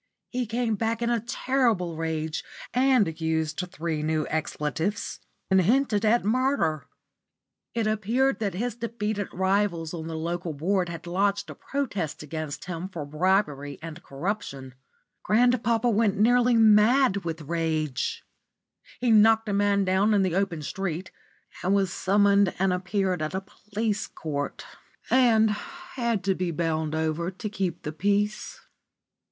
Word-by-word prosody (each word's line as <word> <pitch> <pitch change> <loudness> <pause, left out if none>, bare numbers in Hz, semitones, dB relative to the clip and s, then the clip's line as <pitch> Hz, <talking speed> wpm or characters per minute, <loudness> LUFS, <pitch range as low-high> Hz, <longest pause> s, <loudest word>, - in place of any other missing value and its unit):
He 250 -1 -2
came 230 0 0
back 225 +2 -1
in 235 - +1
a 235 - +2
terrible 230 -7 0
rage, 160 -1 -2 0.3
and 245 -11 +2
used 160 -1 -1
three 160 -3 -3
new 155 0 0
expletives, 160 +5 -2 0.3
and 190 0 +6
hinted 220 +1 +2
at 225 0 +3
murder. 245 - +1 0.9
It 230 -2 0
appeared 225 +6 +1
that 200 -4 -2
his 240 +5 -2
defeated 215 -3 -3
rivals 190 -3 0
on 160 -2 -5
the 160 -1 -4
Local 170 +1 -3
Board 180 +4 0
had 165 0 -7
lodged 200 +3 0
a - - -7
protest 205 - -3
against 155 -1 -5
him 180 +1 -5
for 165 -6 -6
bribery 150 -3 0
and 165 +1 -8
corruption. 140 -4 -4 0.5
Grandpapa 235 0 +2 0.3
nearly 245 +3 +4
went 225 - +6
mad 215 +2 +5
with 165 -4 -4
rage. 155 -2 -2 0.8
He 245 -1 +2
knocked 220 0 +5
a - - 0
man 200 0 +2
down 195 +3 +3
in 200 - +3
the 185 -3 0
open 180 -5 -1
street, 185 +1 -4 0.5
and 190 +2 +2
was 195 -3 +1
summoned 200 -1 +3
and 190 0 +2
appeared 185 -1 -1
at 155 +4 -2
a 190 - -1
police 210 +2 -3
court, 145 -3 -5 0.5
and 225 -4 +5
had 245 - -3
to 195 - +2
be 180 -1 -2
bound 160 -1 -1
over 160 +2 -1
to 195 +3 -6
keep 190 -5 -3
the 150 - -3
peace. 205 +5 -1
195 Hz, 145 wpm, -26 LUFS, 165-220 Hz, 0.9 s, and